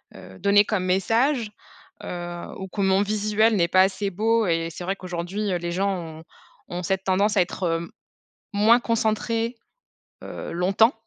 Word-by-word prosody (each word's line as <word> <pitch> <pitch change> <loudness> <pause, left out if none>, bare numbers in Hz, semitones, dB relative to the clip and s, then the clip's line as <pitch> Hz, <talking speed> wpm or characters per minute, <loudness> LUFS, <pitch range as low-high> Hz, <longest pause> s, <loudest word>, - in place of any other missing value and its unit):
heu, 95 -1 -12
donner 205 +1 +5
comme 190 -4 -1
message, 225 +6 +1 0.5
heu, 175 -1 -6
ou 190 - -6
que 200 +2 -4
mon 190 0 +3
visuel 215 +1 +2
n'est 170 -3 +3
pas 185 +2 +4
assez 195 +1 +1
beau 220 +3 +1
et 165 0 0
c'est 175 - -8
vrai 190 +2 -1
qu'aujourd'hui, 185 +3 -4
heu, 180 - +1
les 170 0 -4
gens 195 +3 0 0.3
ont - - -13 0.5
ont 175 0 -4
cette 190 +1 -1
tendance 200 +3 +2
à 190 - +5
être, 180 +2 -3
heu, 165 0 -1 0.6
moins 220 +4 +5
concentrés, 230 0 -1 0.7
heu, - - -7
longtemps 195 +7 +3
195 Hz, 170 wpm, -24 LUFS, 180-215 Hz, 0.7 s, donner